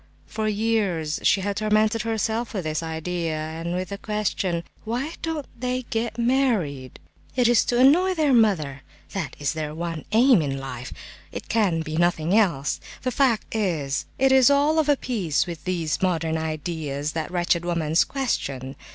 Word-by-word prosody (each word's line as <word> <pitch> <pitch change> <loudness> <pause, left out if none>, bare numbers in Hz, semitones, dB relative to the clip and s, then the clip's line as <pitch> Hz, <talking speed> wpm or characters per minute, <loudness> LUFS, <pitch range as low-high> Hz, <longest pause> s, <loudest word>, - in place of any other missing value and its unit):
For 220 -1 -3
years 205 -8 0
she 195 - +3
had 200 +1 -2
tormented 215 +1 +2
herself 225 +1 -2
with 190 - -2
this 155 0 -2
idea, 165 0 -3
and 160 +3 -4
with 185 -1 -3
the 200 - -6
question: 200 -5 -1 0.2
"Why 250 +8 -3
don't 320 -3 -3
they 255 +1 -1
get 225 0 -2
married?" 230 - 0 0.4
"It 250 -2 +3
is 240 -2 +5
to 240 - 0
annoy 350 +9 +5
their 300 -4 +2
mother; 165 - +2 0.3
that 185 -7 -3
is 145 +1 -1
their 155 -1 -4
one 165 -2 -4
aim 235 -2 +5
in 135 -2 -2
life; 130 -2 -6 0.4
it - - -7
can 200 -7 +2
be 155 0 -4
nothing 175 +1 +2
else. 170 -11 +2 0.2
The 255 - 0
fact 245 -4 +1
is 160 -10 -1
it 270 0 +3
is 265 0 +6
all 290 +3 +3
of 305 -1 +1
a 290 - +4
piece 195 - 0
with 165 -4 -8
these 165 -5 -1
modern 165 -3 0
ideas, 155 -2 -3
that 160 0 -3
wretched 175 -1 +1
woman's 165 -2 +2
question! 135 - -3
185 Hz, 170 wpm, -24 LUFS, 160-235 Hz, 0.4 s, is